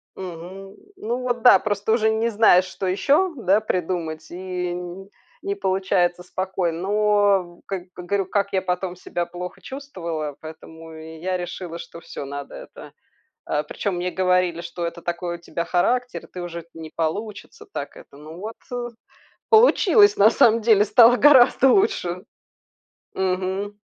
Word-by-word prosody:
Мгм. 190 Hz, +2 st, -9 dB, 0.2 s
Ну 235 Hz, +3 st, -3 dB
вот, 245 Hz, -1 st, -2 dB
да, 220 Hz, -7 st, +8 dB
просто 205 Hz, 0 st, -2 dB
уже 220 Hz, -1 st, +2 dB
не 220 Hz, +1 st, 0 dB
знаешь, 205 Hz, -4 st, +5 dB
что 185 Hz, +1 st, -5 dB
ещё, 295 Hz, -, +2 dB
да, 210 Hz, -4 st, +2 dB
придумать, 165 Hz, -5 st, -3 dB
и 180 Hz, 0 st, -4 dB
н 180 Hz, +2 st, -7 dB, 0.3 s
не 200 Hz, -, -3 dB
получается 190 Hz, -2 st, 0 dB
спокойно. 180 Hz, -2 st, -3 dB
Но, 200 Hz, -3 st, +1 dB
как 190 Hz, -3 st, -4 dB
говорю, 190 Hz, +2 st, -2 dB
как 200 Hz, +1 st, -1 dB
я 190 Hz, -1 st, +1 dB
потом 180 Hz, 0 st, -3 dB
себя 175 Hz, -1 st, -3 dB
плохо 180 Hz, +1 st, -8 dB
чувствовала, 170 Hz, -, -6 dB
поэтому 160 Hz, +1 st, -11 dB
я 160 Hz, +3 st, -5 dB
решила, 175 Hz, -1 st, -6 dB
что 170 Hz, -, -10 dB
всё, 145 Hz, -, -8 dB
надо 140 Hz, 0 st, -7 dB
это, -, -, -11 dB, 0.5 s
а. 150 Hz, -, -1 dB
Причём 195 Hz, +2 st, -3 dB
мне 180 Hz, +1 st, -2 dB
говорили, 180 Hz, -2 st, +1 dB
что 170 Hz, 0 st, -5 dB
это 170 Hz, 0 st, -6 dB
такой 175 Hz, 0 st, -3 dB
у -, -, -8 dB
тебя 170 Hz, 0 st, -4 dB
характер, 245 Hz, +9 st, 0 dB
и -, -, -18 dB
ты 180 Hz, -, -7 dB
уже 170 Hz, -1 st, -7 dB
не 160 Hz, -1 st, -9 dB
получится 210 Hz, -, -4 dB
так -, -, -6 dB
это. -, -, -15 dB
Ну 155 Hz, +3 st, -11 dB
вот, 220 Hz, +3 st, -6 dB, 0.2 s
э, 245 Hz, -1 st, -3 dB, 0.6 s
получилось, 425 Hz, -2 st, +5 dB
на 205 Hz, -, +7 dB
самом 230 Hz, 0 st, +4 dB
деле, 215 Hz, -2 st, +4 dB
стало 240 Hz, +2 st, +6 dB
гораздо 270 Hz, -1 st, +6 dB
лучше. 190 Hz, -, 0 dB, 0.9 s
Мгм. 190 Hz, +2 st, -2 dB
185 Hz, 155 wpm, -22 LUFS, 175-210 Hz, 0.9 s, да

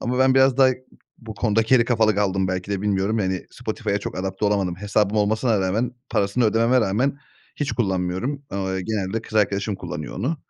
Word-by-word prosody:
Ama 125 Hz, +2 st, -2 dB
ben 130 Hz, 0 st, +4 dB
biraz 135 Hz, -1 st, +4 dB
daha 135 Hz, -1 st, +6 dB, 0.5 s
bu 110 Hz, -2 st, -9 dB
konuda 110 Hz, +1 st, +1 dB
geri 115 Hz, +1 st, +4 dB
kafalı 110 Hz, -3 st, +2 dB
kaldım 95 Hz, -2 st, 0 dB
belki 95 Hz, +1 st, -3 dB
de 100 Hz, -2 st, -1 dB
bilmiyorum, 100 Hz, +2 st, 0 dB
yani, 95 Hz, -2 st, -2 dB
Spotify'a 110 Hz, -3 st, -3 dB
çok -, -, -6 dB
adapte 95 Hz, +2 st, -3 dB
olamadım. 100 Hz, -4 st, +1 dB
Hesabım 105 Hz, +1 st, 0 dB
olmasına 110 Hz, +1 st, +2 dB
rağmen, 105 Hz, +6 st, 0 dB, 0.2 s
parasını 100 Hz, +5 st, +1 dB
ödememe 115 Hz, +3 st, +3 dB
rağmen 125 Hz, +7 st, 0 dB, 0.4 s
hiç 145 Hz, -1 st, -2 dB
kullanmıyorum. 95 Hz, +6 st, -1 dB
Ao 95 Hz, -1 st, -2 dB
eee, 95 Hz, -, -2 dB
genelde 110 Hz, +1 st, -2 dB
kız 110 Hz, -, -12 dB
arkadaşım 100 Hz, 0 st, +1 dB
kullanıyor -, -, -6 dB
onu. 130 Hz, -, -1 dB
105 Hz, 185 wpm, -23 LUFS, 95-120 Hz, 0.5 s, daha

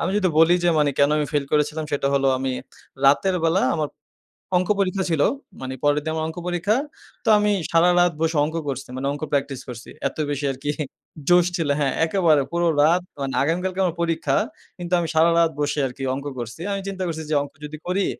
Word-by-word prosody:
আমি -, -, 0 dB
যদি 190 Hz, -3 st, +2 dB
বলি 165 Hz, +2 st, +6 dB
যে -, -, +4 dB
মানি 145 Hz, -1 st, +3 dB
কেনো 140 Hz, +1 st, +4 dB
আমি 150 Hz, -, 0 dB
ফাইল 145 Hz, -1 st, +1 dB
করেছিলা্‌ 150 Hz, +1 st, +1 dB
সেটা 140 Hz, -1 st, +1 dB
হলো 135 Hz, 0 st, +2 dB
আমি 130 Hz, 0 st, -2 dB, 0.5 s
রাতের 165 Hz, +7 st, +4 dB
বেলা 170 Hz, +4 st, +3 dB
আমার 155 Hz, -3 st, -1 dB, 0.7 s
অঙ্ক 180 Hz, 0 st, -1 dB
পরীক্ষা 190 Hz, 0 st, +1 dB
ছিল। 160 Hz, -3 st, +1 dB, 0.4 s
মানি 130 Hz, 0 st, -5 dB
পরের 145 Hz, 0 st, +3 dB
দিন 160 Hz, -, -2 dB
আমার 160 Hz, 0 st, -1 dB
অঙ্ক 160 Hz, -, -7 dB
পরীক্ষা। 180 Hz, +4 st, +1 dB, 0.5 s
তো -, -, -11 dB
আমি 210 Hz, 0 st, +2 dB, 0.2 s
সারারাত 175 Hz, +1 st, +4 dB
বসে 165 Hz, -1 st, +1 dB
অংক 160 Hz, +2 st, -5 dB
করসি। 135 Hz, -2 st, -4 dB
মা্নে 135 Hz, +1 st, -2 dB
অংক 145 Hz, -, -8 dB
প্র্যাকটিস 140 Hz, -2 st, -1 dB
করসি। 120 Hz, -2 st, -9 dB, 0.2 s
এত -, -, -9 dB
বেশি 145 Hz, 0 st, -2 dB
আরকি 135 Hz, +2 st, -3 dB, 0.6 s
জোশ 175 Hz, -1 st, +6 dB
ছিল 165 Hz, -4 st, -1 dB
হ্যাঁ, 140 Hz, -3 st, +1 dB
একেবারে 160 Hz, -5 st, +3 dB
পুরো 170 Hz, 0 st, +1 dB
রাত 170 Hz, +4 st, +4 dB, 0.2 s
মানে 135 Hz, -1 st, -2 dB
আগামীকালকে 180 Hz, +5 st, -1 dB
আমার 170 Hz, -1 st, -1 dB
পরীক্ষা। 165 Hz, -1 st, 0 dB, 0.4 s
কিন্তু 175 Hz, 0 st, -5 dB
আমি 170 Hz, -, -1 dB
সারারাত 165 Hz, +1 st, +4 dB
বসে 145 Hz, 0 st, 0 dB
আরকি 130 Hz, +2 st, -8 dB
অংক 140 Hz, +1 st, -6 dB
করসি। 120 Hz, +6 st, -6 dB
আমি 200 Hz, 0 st, -2 dB
চিন্তা 190 Hz, -1 st, -4 dB
করসি 160 Hz, -1 st, -4 dB
যে -, -, +2 dB
অংক 145 Hz, -, -10 dB
যদি 155 Hz, +1 st, -7 dB
করি, 190 Hz, +2 st, +1 dB
160 Hz, 200 wpm, -23 LUFS, 145-175 Hz, 0.7 s, বলি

